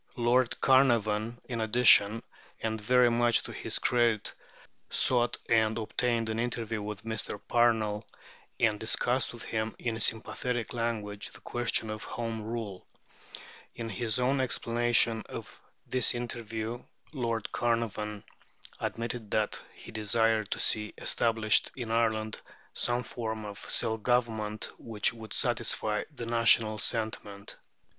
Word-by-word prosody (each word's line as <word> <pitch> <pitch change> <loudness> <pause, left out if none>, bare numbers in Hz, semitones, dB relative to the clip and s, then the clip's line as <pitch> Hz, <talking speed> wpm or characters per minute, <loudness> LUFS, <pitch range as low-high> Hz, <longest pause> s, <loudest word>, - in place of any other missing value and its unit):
Lord 120 +1 +2
Carnarvon, 115 -4 +3
in 120 -3 -3
addition, 110 -1 +6 0.4
and 110 -1 -3
very 125 +2 +4
much 120 0 +3
to - - -7
his - - -1
credit, 120 -3 +1 0.6
sought 120 -1 +3
and 110 -1 +3
obtained 115 +1 -1
an 110 0 -2
interview 115 -2 -2
with 105 0 -6
Mr. 110 -2 -3
Parnell, 110 -3 +2 0.5
and 110 -3 +2
discussed 125 +3 0
with 120 - -9
him, 110 0 -3
in 115 -2 -3
sympathetic 115 +2 -1
language, 110 -4 -3
the - - -13
question 120 -2 -1
of 110 0 -6
Home 115 -2 -4
Rule. 110 -4 -6 0.9
In 115 -1 -5
his 110 +2 -1
own 130 +2 +2
explanation 120 -2 +2
of - - -9 0.2
this 130 -1 +2
interview 115 -1 -4 0.3
Lord 115 -5 -2
Carnarvon 110 -3 -1 0.6
admitted 115 -1 -4
that 105 0 -1
he - - -11
desired 110 0 +1
to - - -3
see 105 -1 +2
established 110 -2 +2
in 120 -4 -5
Ireland 110 -1 0 0.3
some 120 0 +2
form 110 -2 -5
of 105 -1 -8
self 110 -1 +2
government 110 -3 0
which 110 -1 0
would 110 -2 -6
satisfy 105 0 +1
"the 125 -5 -7
national 115 -2 +4
sentiment." 105 -3 -3
115 Hz, 125 wpm, -29 LUFS, 110-120 Hz, 0.9 s, addition